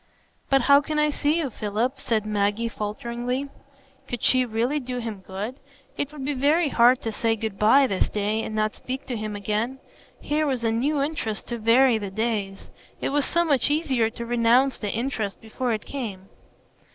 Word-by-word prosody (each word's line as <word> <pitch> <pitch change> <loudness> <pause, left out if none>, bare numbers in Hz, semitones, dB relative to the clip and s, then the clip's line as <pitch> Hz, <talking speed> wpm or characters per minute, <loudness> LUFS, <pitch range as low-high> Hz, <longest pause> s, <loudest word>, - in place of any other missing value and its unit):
"But 270 -2 +4
how 280 +2 +6
can 305 +1 -3
I 300 0 +3
see 295 +2 +1
you, 295 -6 -1
Philip?" 220 +6 -2
said 220 -5 0
Maggie, 210 +2 0
falteringly. 240 +5 -3 0.6
(Could 245 - -5
she 255 -1 +4
really 240 +6 0
do 250 -2 -5
him 225 -4 -4
good? 210 +9 -6 0.4
It 285 0 -3
would 290 -3 -7
be 290 - 0
very 295 +4 +2
hard 245 0 +5
to 225 - -2
say 225 +1 0
"good 220 -2 -5
by" 265 +6 +6
this 195 -7 0
day, 210 +1 -1
and 220 - -5
not 215 0 +1
speak 260 +1 -6
to 250 - -4
him 215 -1 -4
again. 215 +5 -2 0.4
Here 305 +1 0
was 255 -4 -1
a 225 - +2
new 275 +5 +1
interest 280 -8 -3
to 235 -1 -3
vary 230 +1 +4
the 200 -2 -4
days; 205 -2 -3 0.3
it - - -1
was 285 -1 +1
so 340 0 +1
much 285 -4 +3
easier 270 -7 +1
to 235 +1 -7
renounce 240 +3 +3
the 210 - -3
interest 225 -3 -2
before 235 +3 -3
it 215 -2 -2
came.) 205 -9 -6
235 Hz, 190 wpm, -25 LUFS, 215-275 Hz, 0.6 s, how